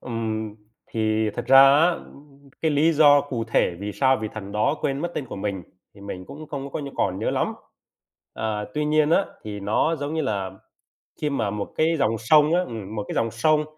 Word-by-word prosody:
Ừm, 110 Hz, -3 st, -4 dB, 0.3 s
thì 110 Hz, -1 st, 0 dB
thật -, -, -6 dB
ra 135 Hz, 0 st, +8 dB, 0.2 s
á, 165 Hz, +4 st, +5 dB
ưm, 140 Hz, -4 st, -11 dB
cái 160 Hz, -, +2 dB
lý 155 Hz, +3 st, +3 dB
do 145 Hz, -2 st, +6 dB
cụ 125 Hz, -5 st, -4 dB
thể 100 Hz, -5 st, +1 dB
vì 105 Hz, 0 st, -4 dB
sao 135 Hz, +2 st, +3 dB
vị 110 Hz, 0 st, -4 dB
thần 100 Hz, -2 st, -7 dB
đó 105 Hz, +8 st, +1 dB
quên 135 Hz, 0 st, -1 dB
mất 175 Hz, +2 st, -3 dB
tên 135 Hz, -, -3 dB
của -, -, -7 dB
mình 95 Hz, -2 st, -3 dB, 0.3 s
thì 100 Hz, -, -16 dB
mình 95 Hz, -2 st, -7 dB
cũng 155 Hz, +2 st, -10 dB
không 140 Hz, -1 st, -6 dB
có -, -, -3 dB
nh -, -, -6 dB
có 140 Hz, -, -6 dB
còn 95 Hz, -1 st, 0 dB
nhớ 110 Hz, -, -1 dB
lắm. -, -, -1 dB, 0.8 s
À, 105 Hz, -1 st, -2 dB
tuy 150 Hz, -, 0 dB
nhiên 155 Hz, 0 st, +2 dB
á, 195 Hz, -, +4 dB, 0.2 s
thì 105 Hz, -1 st, -6 dB
nó 110 Hz, +11 st, +1 dB
giống 145 Hz, +1 st, -4 dB
như 160 Hz, -, 0 dB
là 100 Hz, -7 st, -2 dB, 0.7 s
khi 150 Hz, -, +1 dB
mà 110 Hz, -7 st, -1 dB
một 105 Hz, 0 st, -5 dB
cái 165 Hz, +1 st, +2 dB
dòng 115 Hz, -3 st, +1 dB
sông 150 Hz, +8 st, +4 dB
á 180 Hz, -, +3 dB
ừm, 110 Hz, -, -6 dB
một 105 Hz, -, -3 dB
cái -, -, -4 dB
dòng 115 Hz, 0 st, 0 dB
sông 150 Hz, +7 st, +2 dB
125 Hz, 225 wpm, -24 LUFS, 105-150 Hz, 0.8 s, ra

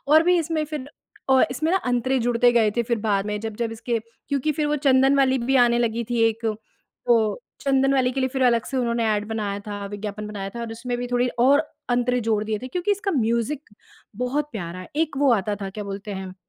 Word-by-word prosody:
और 315 Hz, +1 st, +8 dB
भी 355 Hz, +1 st, +4 dB
इसमें 320 Hz, -1 st, -1 dB
फ़िर 300 Hz, -3 st, -6 dB, 0.4 s
अ, 265 Hz, 0 st, +6 dB
इसमें 310 Hz, +6 st, -1 dB
ना 380 Hz, -, +4 dB
अंतरे 250 Hz, +2 st, +1 dB
जुड़ते 240 Hz, 0 st, +3 dB
गए 225 Hz, -3 st, +4 dB
थे 235 Hz, -, +3 dB
फ़िर 235 Hz, 0 st, -1 dB
बाद 205 Hz, -2 st, 0 dB
में 210 Hz, 0 st, -2 dB
जब 220 Hz, -1 st, -5 dB
जब 230 Hz, -1 st, -2 dB
इसके 230 Hz, +1 st, -2 dB, 0.3 s
क्योंकि 285 Hz, +2 st, 0 dB
फ़िर 300 Hz, 0 st, -1 dB
वो 295 Hz, 0 st, +1 dB
चंदन 270 Hz, 0 st, +5 dB
वाली 265 Hz, -1 st, +3 dB
भी 260 Hz, +3 st, +1 dB
आने 235 Hz, 0 st, +2 dB
लगी 235 Hz, 0 st, 0 dB
थी 240 Hz, -1 st, +1 dB
एक 225 Hz, +1 st, -6 dB, 0.6 s
वो 240 Hz, -, +7 dB, 0.4 s
चंदन 270 Hz, 0 st, +2 dB
वाली 255 Hz, -1 st, +2 dB
के 270 Hz, -, -2 dB
लिए 260 Hz, -, +1 dB
फ़िर 265 Hz, 0 st, -2 dB
अलग 235 Hz, -2 st, +3 dB
से 270 Hz, -, -4 dB
उन्होंने 235 Hz, -2 st, 0 dB
एड 210 Hz, 0 st, -2 dB
बनाया 210 Hz, -3 st, -2 dB
था, 205 Hz, -1 st, -6 dB
विज्ञापन 205 Hz, +1 st, -6 dB
बनाया 200 Hz, -2 st, -5 dB
था 235 Hz, -, -5 dB
और 230 Hz, -1 st, -5 dB
उसमें 245 Hz, +2 st, -4 dB
भी 245 Hz, -, -3 dB
थोड़ी 245 Hz, 0 st, +2 dB
और 270 Hz, +4 st, +5 dB, 0.3 s
अंतरे 245 Hz, 0 st, +1 dB
जोड़ 220 Hz, -2 st, 0 dB
दिए 215 Hz, 0 st, -2 dB
थे 255 Hz, -, -5 dB
क्योंकि 360 Hz, +8 st, -2 dB
इसका 405 Hz, 0 st, 0 dB
म्यूज़िक 240 Hz, -, -1 dB, 0.5 s
बहुत 265 Hz, +5 st, -1 dB
प्यारा 180 Hz, -4 st, -5 dB
है। 185 Hz, -, -10 dB
एक 315 Hz, -2 st, 0 dB
वो 280 Hz, -3 st, +4 dB
आता 205 Hz, -1 st, -1 dB
था 195 Hz, -1 st, -4 dB
क्या 210 Hz, +2 st, -6 dB
बोलते 200 Hz, +1 st, -6 dB
हैं? 190 Hz, -1 st, -6 dB
240 Hz, 235 wpm, -23 LUFS, 215-270 Hz, 0.6 s, और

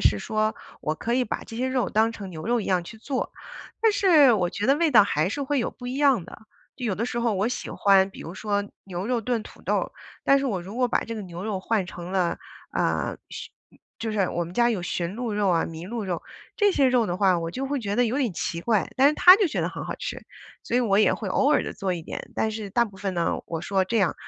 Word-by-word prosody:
是 105 Hz, -, +3 dB
说 215 Hz, -, -1 dB, 0.3 s
我 155 Hz, -, -1 dB
可 235 Hz, +9 st, -2 dB
以 255 Hz, 0 st, +2 dB
把 -, -, -4 dB
这 225 Hz, -, -9 dB
些 260 Hz, +2 st, 0 dB
肉 260 Hz, -1 st, 0 dB
当 225 Hz, +1 st, +2 dB
成 200 Hz, -4 st, -8 dB
牛 155 Hz, -2 st, -8 dB
肉 240 Hz, 0 st, +2 dB
一 -, -, -5 dB
样 180 Hz, -2 st, +1 dB
去 220 Hz, +5 st, -11 dB
做。 265 Hz, +3 st, -3 dB, 0.5 s
但 445 Hz, -1 st, +5 dB
是 320 Hz, -10 st, +6 dB
我 180 Hz, -5 st, +1 dB
觉 205 Hz, -, -2 dB
得 275 Hz, -, +5 dB
味 325 Hz, -1 st, +2 dB
道 215 Hz, -5 st, +8 dB
还 155 Hz, -3 st, +1 dB
是 285 Hz, +7 st, -3 dB
会 280 Hz, +1 st, 0 dB
有 235 Hz, -, -1 dB
不 245 Hz, -, -10 dB
一 255 Hz, +2 st, -3 dB
样 275 Hz, -, +3 dB
的， -, -, -12 dB, 0.3 s
就 255 Hz, -, -6 dB
有 205 Hz, -, 0 dB
的 230 Hz, +5 st, -2 dB
时 240 Hz, -, -3 dB
候 235 Hz, -1 st, +1 dB
我 200 Hz, +5 st, +1 dB
喜 250 Hz, -, -4 dB
欢， 195 Hz, -1 st, +4 dB
比 -, -, -12 dB
如 170 Hz, -, -7 dB
说 205 Hz, 0 st, -1 dB, 0.2 s
牛 185 Hz, +1 st, -5 dB
肉 245 Hz, -2 st, 0 dB
炖 230 Hz, -1 st, -1 dB
土 -, -, -14 dB
豆， -, -, -1 dB, 0.3 s
但 275 Hz, -, +5 dB
是 275 Hz, -, -1 dB
我 200 Hz, -7 st, -1 dB
如 200 Hz, +6 st, -9 dB
果 250 Hz, -1 st, +3 dB
把 -, -, +1 dB
这 230 Hz, -, -5 dB
个 215 Hz, -, -5 dB
牛 175 Hz, 0 st, -7 dB
肉 210 Hz, -3 st, -2 dB
换 200 Hz, -1 st, 0 dB
成 175 Hz, -1 st, -8 dB
了， 180 Hz, -3 st, +1 dB, 0.3 s
呃， -, -, 0 dB
驯 -, -, -7 dB, 0.5 s
就 225 Hz, -1 st, -3 dB
是 195 Hz, -4 st, +1 dB
我 175 Hz, -, -2 dB
们 170 Hz, -, -9 dB
家 240 Hz, +4 st, +3 dB
有 210 Hz, -7 st, -1 dB
驯 175 Hz, +1 st, -3 dB
鹿 240 Hz, -2 st, -3 dB
肉 205 Hz, -1 st, +1 dB
啊， 170 Hz, -2 st, +2 dB
麋 165 Hz, +2 st, -7 dB
鹿 230 Hz, -2 st, -3 dB
肉， 175 Hz, -3 st, -3 dB, 0.3 s
这 410 Hz, -2 st, +4 dB
些 275 Hz, -6 st, +4 dB
肉 245 Hz, -3 st, +3 dB
的 175 Hz, -, -2 dB
话， 185 Hz, -2 st, +3 dB
我 165 Hz, 0 st, -3 dB
就 260 Hz, +9 st, -4 dB
会 280 Hz, -1 st, -2 dB
觉 205 Hz, -1 st, -2 dB
得 245 Hz, -, +4 dB
有 245 Hz, +5 st, 0 dB
点 250 Hz, -6 st, +1 dB
奇 170 Hz, -, -3 dB
怪， 215 Hz, +1 st, +1 dB
但 275 Hz, +2 st, +6 dB
是 300 Hz, -, +1 dB
他 365 Hz, +3 st, +9 dB
就 410 Hz, -3 st, +2 dB
觉 -, -, -2 dB
得 -, -, 0 dB
很 -, -, -6 dB
好 -, -, -4 dB
吃。 -, -, -5 dB, 0.4 s
所 240 Hz, -, -1 dB
以 -, -, +4 dB
我 205 Hz, -4 st, +2 dB
也 215 Hz, -, +4 dB
会 210 Hz, -, -5 dB
偶 270 Hz, +9 st, +2 dB
尔 300 Hz, -, +4 dB
地 -, -, -5 dB
做 190 Hz, -2 st, -2 dB
一 170 Hz, -, -6 dB
点， -, -, -7 dB
但 220 Hz, -, 0 dB
是 215 Hz, -2 st, -5 dB
大 235 Hz, +4 st, +2 dB
部 200 Hz, -3 st, -11 dB
分 195 Hz, -2 st, -3 dB
呢， 170 Hz, -1 st, 0 dB
我 165 Hz, -1 st, -4 dB
说， 190 Hz, 0 st, +1 dB
这 230 Hz, +5 st, -2 dB
样， 190 Hz, -6 st, +2 dB
215 Hz, 295 characters per minute, -25 LUFS, 185-250 Hz, 0.5 s, 他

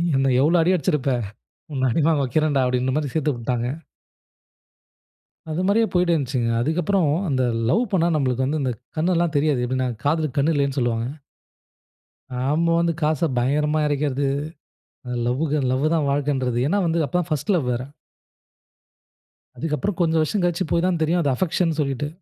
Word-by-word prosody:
என்ன 135 Hz, 0 st, +2 dB
எவ்ளோ 160 Hz, +5 st, +4 dB
அடி 180 Hz, +3 st, +3 dB
அடிச்சிருப்ப 150 Hz, -4 st, 0 dB, 0.6 s
உன்ன 130 Hz, -1 st, +1 dB
அடி 160 Hz, -, +1 dB
வாங்க 155 Hz, -3 st, +2 dB
வைக்கிறேன்டா. 145 Hz, +1 st, +1 dB
அப்டின்ற 125 Hz, +1 st, 0 dB
மாரி 150 Hz, -3 st, -1 dB
சேர்த்து 155 Hz, -2 st, +1 dB
விட்டாங்க. 120 Hz, 0 st, -2 dB, 1.8 s
அது 160 Hz, +4 st, -2 dB
மாரியே 225 Hz, +3 st, +3 dB
போயிட்டு 180 Hz, -1 st, +2 dB
இருந்துச்சுங்க. 130 Hz, -6 st, 0 dB
அதுக்கப்புறம் 165 Hz, +5 st, +1 dB, 0.2 s
அந்த 130 Hz, -2 st, +1 dB, 0.3 s
லவ் 225 Hz, -, +3 dB
பண்ணா 170 Hz, -3 st, +2 dB
நமக்கு 130 Hz, -3 st, 0 dB
வந்து 150 Hz, +4 st, -1 dB
இந்தகண்ணெல்லாம் 160 Hz, -, -1 dB
தெரியாது. 145 Hz, -4 st, +1 dB
எப்டின 130 Hz, 0 st, -1 dB, 0.2 s
"காதலுக்கு 155 Hz, -1 st, 0 dB
கண் 150 Hz, +4 st, +2 dB
இல்லைன்னு 140 Hz, -1 st, 0 dB
சொல்வாங்க." 115 Hz, -1 st, 0 dB, 1.2 s
நம்ம 140 Hz, +7 st, 0 dB
வந்து 170 Hz, -1 st, +1 dB
காச 155 Hz, +1 st, +1 dB
பயங்கரமா 150 Hz, +5 st, +1 dB
இறைக்கிறது. 145 Hz, -1 st, 0 dB, 1.0 s
லவ் 125 Hz, +5 st, 0 dB
க 150 Hz, -, +2 dB
லவ் 130 Hz, +3 st, 0 dB
தான் 155 Hz, -4 st, +1 dB
வாழ்க்கைன்றது. 135 Hz, -4 st, 0 dB
ஏனா 200 Hz, +4 st, +1 dB
வந்து, 165 Hz, 0 st, +1 dB
அப்போ 160 Hz, -, -3 dB
தான் 175 Hz, -, -5 dB
பர்ஸ்ட் 155 Hz, +7 st, 0 dB
லவ் 140 Hz, -7 st, -1 dB
வேற. 120 Hz, +1 st, -2 dB, 1.8 s
அதுக்கப்புறம் 165 Hz, +4 st, -2 dB
கொஞ்சம் 160 Hz, -1 st, +2 dB
வருஷம் 180 Hz, +4 st, -1 dB
கழிச்சு 175 Hz, +1 st, 0 dB
போய் 170 Hz, +1 st, +2 dB
தான் 175 Hz, -3 st, 0 dB
தெரியும். 170 Hz, +3 st, +2 dB
அது 140 Hz, -, +1 dB
அஃபெக்ஷன்னு 170 Hz, +1 st, 0 dB
சொல்லிட்டு. 140 Hz, 0 st, -2 dB
150 Hz, 150 wpm, -22 LUFS, 130-165 Hz, 1.8 s, எவ்ளோ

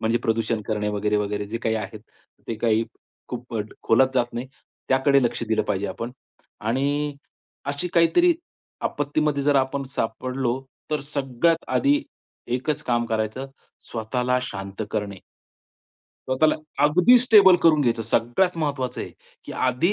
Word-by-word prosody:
म्हणजे 115 Hz, +2 st, +1 dB
प्रदूषण 115 Hz, -2 st, 0 dB
करणे 105 Hz, -1 st, -1 dB
वगैरे-वगैरे. 105 Hz, 0 st, -1 dB
जे 115 Hz, +3 st, -4 dB
काही 110 Hz, -1 st, 0 dB
आहे 110 Hz, 0 st, -4 dB
ते 110 Hz, +1 st, -11 dB
काही 115 Hz, 0 st, +2 dB, 0.4 s
खूप 125 Hz, -1 st, -7 dB
अ, 110 Hz, -, 0 dB, 0.2 s
खोलात 130 Hz, +4 st, +4 dB
जात 120 Hz, -1 st, +1 dB
नाही. 120 Hz, +2 st, -4 dB, 0.4 s
त्याकडे 135 Hz, +1 st, +4 dB
लक्ष 120 Hz, -, -1 dB
दिलं 110 Hz, -1 st, +2 dB
पाहिजे 100 Hz, -1 st, -1 dB
आपण. 120 Hz, +4 st, -5 dB, 0.5 s
आणि 140 Hz, +6 st, 0 dB, 0.5 s
अशी 145 Hz, +5 st, -2 dB
काहीतरी 345 Hz, -, +5 dB, 0.5 s
आपत्तीमध्ये 145 Hz, 0 st, 0 dB
जर 145 Hz, 0 st, +3 dB
आपण 135 Hz, +1 st, +1 dB
सापडलो. 125 Hz, +2 st, -1 dB, 0.3 s
तर 150 Hz, -, 0 dB
सगळ्यात 140 Hz, +3 st, 0 dB
आधी 290 Hz, +2 st, +2 dB, 0.5 s
एकच 140 Hz, +4 st, -1 dB
काम 120 Hz, -3 st, +1 dB
करायचं, 110 Hz, +3 st, -2 dB, 0.4 s
स्वतःला 125 Hz, +3 st, 0 dB
शांत 100 Hz, -3 st, -5 dB
करणे. 105 Hz, -3 st, -3 dB, 1.1 s
स्वतःला 155 Hz, +4 st, +3 dB, 0.3 s
अगदी 180 Hz, +11 st, +6 dB
स्टेबल 210 Hz, -7 st, +7 dB
करून 155 Hz, -2 st, +5 dB
घ्यायचं, 120 Hz, -4 st, +1 dB
सगळ्यात 120 Hz, -, +1 dB
महत्वाचं 140 Hz, -5 st, -2 dB
आहे, -, -, -5 dB, 0.3 s
की -, -, -7 dB, 0.2 s
आधी 130 Hz, +10 st, +2 dB
125 Hz, 135 wpm, -24 LUFS, 110-145 Hz, 1.1 s, स्टेबल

